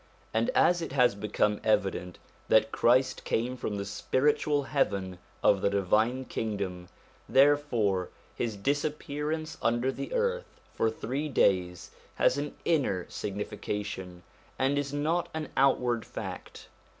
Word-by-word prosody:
And 115 +1 +1
as 175 -1 +4
it 160 -5 -5
has 125 -5 +4
become 105 0 0
evident 95 -4 0 0.3
that 110 0 +4
Christ 130 +2 +2
came 120 +3 -1
from 110 -4 -4
the 100 - -3
spiritual 145 +7 +1
heaven 100 -10 -1 0.2
of 100 - +4
the - - +3
Divine 110 +6 +1
Kingdom, 100 -7 -4 0.4
therefore 125 -9 +3 0.2
his 115 -3 -2
disappearance 150 +5 -2
under 120 +3 +1
the - - -6
earth 485 0 -1 0.2
for 115 - +1
three 135 +7 -3
days 90 -8 +1 0.2
has 140 - +3
an 145 0 -4
inner 130 - +1
signification, 100 -2 -5 0.3
and 135 +2 +1
is 140 -1 -3
not 155 +4 0
an 155 -1 -4
outward 125 -4 +2
fact. - - -8
120 Hz, 125 wpm, -29 LUFS, 100-145 Hz, 0.4 s, as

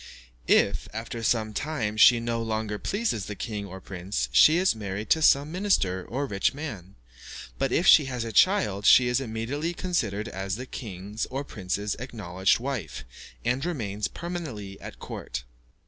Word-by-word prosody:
If, - - +3
after 115 +1 -5
some 110 -1 +1
time, 120 -6 -2
she 115 +2 +7
no 115 0 -2
longer 110 -2 -2
pleases 200 - -2
the 105 - -5
king 105 0 -5
or 95 0 -9
prince, 90 -9 -4
she 155 - +7
is 185 +1 +3
married 105 -1 -5
to 160 - +4
some 145 0 +4
minister 165 - +1
or 135 +8 -3
rich 100 +1 0
man; 105 - -7 0.6
but, 135 -2 0
if 170 - +2
she 155 -6 +8
has 125 -3 -3
a 115 - -5
child, 105 - +3
she 125 - +7
is 125 +2 +1
immediately 135 +8 -3
considered 115 - -1
as 95 -2 -4
the 125 +3 -6
king's 105 -4 -6
or 135 +2 -4
prince's 100 -4 -3
acknowledged 100 -7 0
wife, 130 - -4 0.4
and 125 +3 0
remains 105 - -2
permanently 145 - -6
at - - -9
court. 65 +1 -6
115 Hz, 165 wpm, -26 LUFS, 100-140 Hz, 0.6 s, she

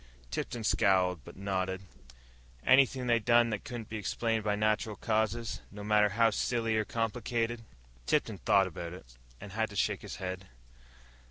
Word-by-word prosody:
Tipton 120 -2 -3
scowled, 95 - +2
but - - -12
nodded. 95 -1 -2 0.8
"Anything 130 -1 +5
they 120 -1 +3
done 120 +1 +4
that 105 - -3
couldn't 120 -3 -6
be 110 - -5
explained 110 +2 -1
by 105 -1 +1
natural 110 0 0
causes, 110 +2 -1
no 105 0 -9
matter 105 0 +4
how 115 +2 +3
silly 115 +1 0
or 110 0 +1
complicated?" 115 +1 -1 0.5
Tipton - - +1
thought 95 -1 +4
about 85 -1 -6
it, - - -13 0.2
and 100 - -9
had 110 +3 -1
to 105 - -11
shake - - 0
his - - -7
head. 95 0 -5
110 Hz, 160 wpm, -31 LUFS, 100-115 Hz, 0.8 s, Anything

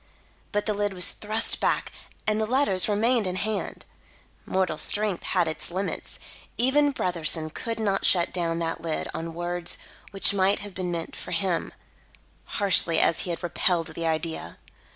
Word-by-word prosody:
But 205 0 0
the 215 - +1
lid 205 -1 -1
was 180 0 +3
thrust 215 +1 -1
back, - - +1 0.3
and 215 0 +1
the 215 - 0
letters 230 -7 +2
remained 225 +1 +2
in 180 - -2
hand. 210 +2 -3 0.6
Mortal 185 -5 0
strength 205 -3 +1
has 170 - +2
its 155 -1 -3
limits. 190 +3 -4 0.4
Even 285 +4 +4
Brotherson 165 - 0
could 230 -1 -4
not 200 -3 0
shut 175 -2 +4
down 170 -2 0
that 165 -1 -2
lid 160 -2 -2
on 165 0 -5
words 175 0 -2 0.3
which 195 0 +4
might 195 0 +3
have 205 -1 -8
been 180 -1 -3
meant 170 -1 -4
for - - -7
him, 175 0 0 0.9
harshly 190 -5 +4
as 165 - +3
he - - -3
had 170 0 -4
repelled 175 -1 +1
the 165 +1 -3
idea. 160 0 -2
185 Hz, 165 wpm, -26 LUFS, 170-210 Hz, 0.9 s, Even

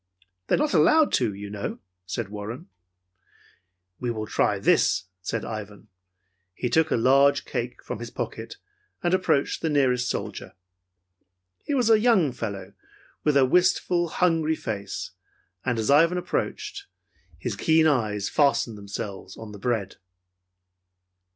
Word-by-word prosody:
"They - - +3
are - - 0
not 300 0 0
allowed 315 -1 +4
to, 120 -4 +2
you 100 +1 -8
know," 105 -1 -4 0.3
said 100 +2 -3
Warren. 105 +3 -7 1.3
"We 125 - -2
will 110 -2 -3
try 105 -1 +1
this," 95 -2 +3 0.2
said 110 +4 -3
Ivan. 105 -2 -7 0.7
He 125 - -2
took 160 +2 +3
a - - +2
large 135 +4 +4
cake - - -4
from - - -5
his - - -6
pocket - - -6 0.5
and 175 +1 +1
approached 185 -7 +1
the 160 - 0
nearest 125 -4 +2
soldier. - - -5 1.1
He 290 - -1
was 240 -4 +3
a 220 - +6
young 210 - +3
fellow 100 -5 -6 0.5
with 150 -2 +3
a 135 - +6
wistful, 180 +2 +2
hungry 165 -2 +1
face, 100 -7 -5 0.5
and 125 -2 0
as 110 +4 +1
Ivan 165 +5 +5
approached, 400 - -3 0.5
his - - -4
keen 160 0 +3
eyes 110 -9 +1
fastened 135 -7 +1
themselves 100 -1 -7
on 110 -1 -9
the 105 - -10
bread. 110 -4 -2
125 Hz, 140 wpm, -25 LUFS, 105-160 Hz, 1.3 s, a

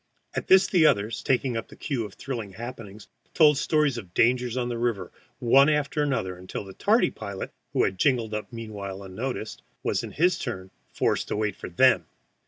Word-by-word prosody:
At - - -3
this 190 0 +7
the 170 -6 +4
others, 105 -3 +1
taking 130 -1 +1
up 115 - -3
the - - -14
cue 130 -8 -3
of 100 - -10
thrilling 115 -7 -5
happenings, 110 -2 -9 0.3
told 150 -3 +6
stories 150 -6 +1
of 95 -5 -13
dangers 125 0 +2
on 125 -1 0
the 120 -1 -3
river 110 -7 -1 0.3
one 135 +4 +5
after 150 0 0
another 125 -11 -1
until 90 +2 -6
the 95 -1 -11
tardy - - +2
pilot, - - -7 0.2
who - - +3
had 95 -1 -1
jingled 120 -6 +2
up 105 +3 -4
meanwhile 100 -4 -7
unnoticed, 110 +4 -5 0.2
was - - 0
in - - -8
his 175 +3 +2
turn 95 -7 -5 0.2
forced - - 0
to - - -2
wait 105 0 -1
for - - -8
them. 85 - +4
115 Hz, 190 wpm, -26 LUFS, 100-135 Hz, 0.3 s, this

